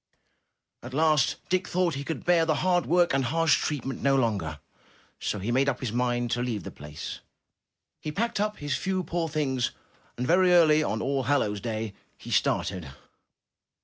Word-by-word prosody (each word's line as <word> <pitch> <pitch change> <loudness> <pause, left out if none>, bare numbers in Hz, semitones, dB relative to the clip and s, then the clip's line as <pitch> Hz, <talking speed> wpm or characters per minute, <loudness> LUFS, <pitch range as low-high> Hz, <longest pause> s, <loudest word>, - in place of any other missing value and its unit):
*' - - -55
At 130 +2 -8
last 155 -3 +3
Dick 185 0 0
thought 180 -2 +1
he 140 +1 -4
could 160 +3 -5
bear 175 -2 +4
the 160 -1 +1
hard 175 -2 +2
work 175 -1 +3
and 135 -1 +1
harsh 165 +4 +2
treatment 135 -3 -3
no 140 0 +3
longer, 100 - 0 0.6
so - - -2
he 105 +4 -3
made 135 +3 +3
up 125 - -2
his 125 -5 -3
mind 120 -1 0
to 120 - 0
leave 115 -6 -2
the - - -7
place. 75 +1 -8 0.8
He 155 - -5
packed 230 +6 -1
up 210 +1 -1
his 145 0 -2
few 190 -1 -1
poor 165 -1 -2
things 135 -5 0 0.5
and 125 - -2
very 180 +4 +4
early 155 -3 +6
on 110 -7 -1
All 135 0 0
hallows 105 -7 +1
Day, 110 -3 -3 0.2
he - - -10
started. 90 -7 0
140 Hz, 180 wpm, -27 LUFS, 120-165 Hz, 0.8 s, early